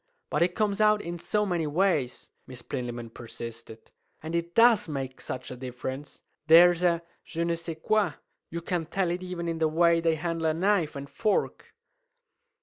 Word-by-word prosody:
"But 150 Hz, -, 0 dB
it 175 Hz, +1 st, +2 dB
comes 210 Hz, -1 st, 0 dB
out 215 Hz, 0 st, +5 dB
in 170 Hz, +1 st, -5 dB
so 210 Hz, +5 st, 0 dB
many 175 Hz, -5 st, -1 dB
ways," 150 Hz, -5 st, 0 dB, 0.2 s
Miss 125 Hz, -2 st, -9 dB
Plinlimmon 120 Hz, -3 st, -5 dB
persisted; 115 Hz, -1 st, -10 dB, 0.3 s
"and 160 Hz, +2 st, -4 dB
it 170 Hz, 0 st, -3 dB
does 230 Hz, -4 st, +5 dB
make 135 Hz, -4 st, -5 dB
such 130 Hz, 0 st, -6 dB
a -, -, -5 dB
difference! 130 Hz, +2 st, -7 dB, 0.2 s
There's 175 Hz, +2 st, +7 dB
a 170 Hz, -1 st, +2 dB, 0.2 s
je 165 Hz, 0 st, -3 dB
ne 170 Hz, 0 st, 0 dB
sais 165 Hz, -1 st, -5 dB
quoi. 215 Hz, +5 st, +1 dB, 0.4 s
You 170 Hz, 0 st, -5 dB
can 170 Hz, -2 st, -2 dB
tell 180 Hz, 0 st, 0 dB
it 175 Hz, +1 st, -3 dB
even 180 Hz, -2 st, -5 dB
in 165 Hz, -1 st, -2 dB
the 160 Hz, -, +3 dB
way 165 Hz, +1 st, +3 dB
they 165 Hz, -1 st, +2 dB
handle 165 Hz, 0 st, -2 dB
a 155 Hz, -, +1 dB
knife 180 Hz, -3 st, +1 dB
and 140 Hz, 0 st, -6 dB
fork!" 210 Hz, +9 st, -1 dB
165 Hz, 180 wpm, -27 LUFS, 140-180 Hz, 0.4 s, There's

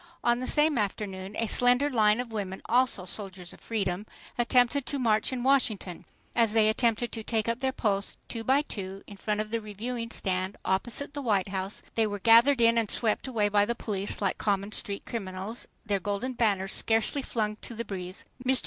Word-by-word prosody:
On 240 Hz, 0 st, +2 dB
the 255 Hz, -, -3 dB
same 295 Hz, -3 st, +3 dB
afternoon 195 Hz, -1 st, -4 dB
a 230 Hz, -, 0 dB
slender 245 Hz, +5 st, +5 dB
line 220 Hz, -5 st, +3 dB
of 245 Hz, -2 st, -4 dB
women—also 210 Hz, +1 st, 0 dB
"soldiers 190 Hz, -2 st, -3 dB
of -, -, -16 dB
freedom"—attempted 235 Hz, +6 st, 0 dB
to 285 Hz, -, +1 dB
march 220 Hz, -4 st, +1 dB
in 250 Hz, -2 st, -3 dB
Washington. 225 Hz, -9 st, +1 dB, 0.3 s
As 230 Hz, -3 st, +3 dB
they 220 Hz, -1 st, +4 dB
attempted 235 Hz, +1 st, +1 dB
to 225 Hz, -, -4 dB
take 220 Hz, -1 st, -1 dB
up 230 Hz, +1 st, -1 dB
their 265 Hz, 0 st, 0 dB
posts, 200 Hz, -5 st, -1 dB
two 230 Hz, -1 st, -4 dB
by 270 Hz, +5 st, +3 dB
two, 195 Hz, -7 st, -6 dB
in 205 Hz, -, -11 dB
front 210 Hz, +2 st, -2 dB
of 215 Hz, 0 st, -7 dB
the 230 Hz, 0 st, -1 dB
Reviewing 230 Hz, +3 st, -5 dB
Stand, 185 Hz, -3 st, -2 dB
opposite 240 Hz, +9 st, 0 dB
the 290 Hz, -, -4 dB
White 200 Hz, -7 st, +1 dB
House, 190 Hz, +1 st, -3 dB
they 225 Hz, -1 st, +2 dB
were 205 Hz, -1 st, -4 dB
gathered 235 Hz, +5 st, +5 dB
in 230 Hz, 0 st, +5 dB
and 220 Hz, -3 st, -1 dB
swept 225 Hz, +2 st, 0 dB
away 220 Hz, -5 st, +1 dB
by 205 Hz, 0 st, +3 dB
the 235 Hz, +3 st, -1 dB
police 200 Hz, -3 st, -3 dB
like -, -, 0 dB
common 200 Hz, 0 st, 0 dB
street 200 Hz, -2 st, -2 dB
criminals—their 200 Hz, 0 st, -4 dB
golden 205 Hz, +6 st, -3 dB
banners 200 Hz, -5 st, +1 dB
scarcely 225 Hz, +5 st, +2 dB
flung 215 Hz, -4 st, -2 dB
to 235 Hz, -, -8 dB
the 235 Hz, +1 st, -4 dB
breeze. 185 Hz, -2 st, -7 dB, 0.2 s
MR. 260 Hz, 0 st, +4 dB
220 Hz, 190 wpm, -28 LUFS, 200-240 Hz, 0.3 s, slender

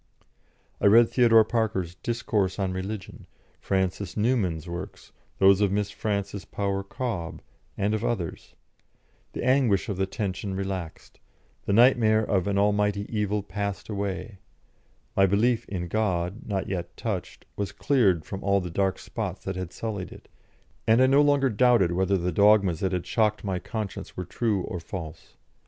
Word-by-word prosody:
I -, -, +5 dB
read 115 Hz, +3 st, +7 dB
Theodore 115 Hz, -3 st, +5 dB
Parker's 105 Hz, -7 st, -1 dB
"Discourse 105 Hz, -2 st, -1 dB
on 95 Hz, -2 st, -1 dB
Religion," 95 Hz, +1 st, -6 dB, 0.3 s
Francis 95 Hz, -1 st, -2 dB
Newman's 100 Hz, -8 st, 0 dB
works, 85 Hz, +4 st, -7 dB, 0.3 s
those 95 Hz, +1 st, +5 dB
of 100 Hz, -2 st, +3 dB
Miss 105 Hz, 0 st, -1 dB
Frances 100 Hz, -2 st, -3 dB
Power 100 Hz, -1 st, -2 dB
Cobbe, 100 Hz, -5 st, -4 dB, 0.4 s
and 100 Hz, +2 st, 0 dB
of 110 Hz, 0 st, -1 dB
others; 95 Hz, -9 st, -3 dB, 0.8 s
the -, -, -4 dB
anguish 125 Hz, -4 st, +2 dB
of 100 Hz, -, -2 dB
the 95 Hz, 0 st, 0 dB
tension 95 Hz, -1 st, -3 dB
relaxed; 95 Hz, -4 st, -5 dB, 0.5 s
the 100 Hz, -, 0 dB
nightmare 110 Hz, -2 st, +5 dB
of 95 Hz, -4 st, 0 dB
an 100 Hz, -1 st, 0 dB
Almighty 105 Hz, 0 st, +1 dB
Evil 105 Hz, -1 st, 0 dB
passed 100 Hz, +1 st, -4 dB
away; 100 Hz, 0 st, -4 dB, 0.8 s
my 95 Hz, 0 st, +5 dB
belief 115 Hz, +5 st, +1 dB
in 90 Hz, -3 st, -3 dB
God, 95 Hz, -1 st, -1 dB
not 95 Hz, -2 st, -2 dB
yet 90 Hz, -3 st, -5 dB
touched, 100 Hz, -6 st, -4 dB
was 100 Hz, -1 st, -3 dB
cleared 100 Hz, -, +2 dB
from 95 Hz, -, -6 dB
all 100 Hz, 0 st, +3 dB
the 90 Hz, -2 st, -5 dB
dark 95 Hz, +2 st, 0 dB
spots 100 Hz, -5 st, -5 dB
that 95 Hz, -, -4 dB
had 90 Hz, -1 st, -5 dB
sullied 105 Hz, -5 st, -5 dB
it, -, -, -13 dB, 0.6 s
and 110 Hz, +2 st, +5 dB
I 130 Hz, -, +6 dB
no 135 Hz, +2 st, +5 dB
longer 140 Hz, -2 st, +3 dB
doubted 115 Hz, -5 st, +4 dB
whether 95 Hz, +2 st, +1 dB
the 90 Hz, 0 st, -1 dB
dogmas 100 Hz, -2 st, +4 dB
that 95 Hz, -, 0 dB
had 90 Hz, -2 st, -2 dB
shocked 110 Hz, -2 st, +1 dB
my 95 Hz, -3 st, -2 dB
conscience 105 Hz, +2 st, -6 dB
were 90 Hz, -, -3 dB
true 100 Hz, +1 st, -1 dB
or 90 Hz, -, -5 dB
false. 80 Hz, -1 st, -8 dB
100 Hz, 160 wpm, -26 LUFS, 95-110 Hz, 0.8 s, read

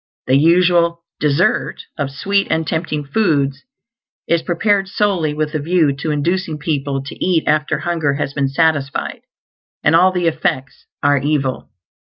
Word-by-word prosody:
The 130 Hz, -, +3 dB
usual 170 Hz, +2 st, +3 dB, 0.2 s
"dessert" 145 Hz, -2 st, +1 dB
of 140 Hz, -, -2 dB
sweet 195 Hz, +8 st, 0 dB
and 160 Hz, 0 st, 0 dB
tempting 155 Hz, -2 st, -2 dB
foods 145 Hz, -5 st, 0 dB, 0.7 s
is 170 Hz, -1 st, +2 dB
prepared 195 Hz, +4 st, +1 dB
solely 190 Hz, -6 st, 0 dB
with 150 Hz, 0 st, -2 dB
a 155 Hz, -, -1 dB
view 160 Hz, -1 st, +2 dB
to 155 Hz, +3 st, -3 dB
inducing 160 Hz, +2 st, -1 dB
people 140 Hz, -3 st, -2 dB
to 140 Hz, -, -7 dB
eat 175 Hz, -3 st, +2 dB
after 150 Hz, 0 st, +1 dB
hunger 160 Hz, -5 st, 0 dB
has 140 Hz, -1 st, -3 dB
been 140 Hz, -2 st, 0 dB
satisfied; 145 Hz, -1 st, 0 dB, 0.6 s
and 150 Hz, -, +4 dB
all 185 Hz, +3 st, +5 dB
the 180 Hz, -2 st, -1 dB
effects 145 Hz, -5 st, -2 dB, 0.2 s
are 145 Hz, 0 st, +4 dB
evil. 135 Hz, -2 st, -1 dB
155 Hz, 150 wpm, -18 LUFS, 140-170 Hz, 0.7 s, all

